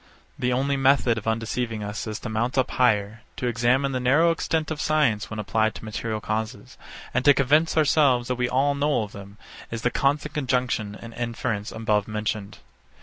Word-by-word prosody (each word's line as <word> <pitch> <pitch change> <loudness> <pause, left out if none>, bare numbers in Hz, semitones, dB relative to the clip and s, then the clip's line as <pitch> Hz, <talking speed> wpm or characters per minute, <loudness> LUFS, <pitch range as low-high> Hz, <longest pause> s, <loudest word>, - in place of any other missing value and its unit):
The 125 0 0
only 135 +3 +1
method 135 -4 +3
of 110 - -11
undeceiving 115 0 -2
us 105 +2 -5
is 110 -1 -4
to - - -5
mount 115 +4 -1
up 130 - +2
higher; 110 -3 +1 0.2
to - - -3
examine 120 +3 +2
the 130 - -1
narrow 145 +7 +4
extent 160 -1 -1
of 150 - -3
science 150 -9 +1
when 110 - -6
applied 110 +1 0
to - - -9
material 110 0 -3
causes; 110 +4 -4 0.4
and 130 - +1
to 145 0 +6
convince 150 +5 +3
ourselves 140 -5 +3
that 125 -1 0
all 135 +3 +2
we 140 - -6
know 145 -5 +2
of 105 - -8
them 100 0 -11 0.3
is 115 -1 -5
the 125 - +2
constant 145 +3 0
conjunction 125 -6 -1
and 115 0 -10
inference 115 -3 -3
above 105 -2 0
mentioned. 105 -1 -3
120 Hz, 190 wpm, -25 LUFS, 110-135 Hz, 0.4 s, to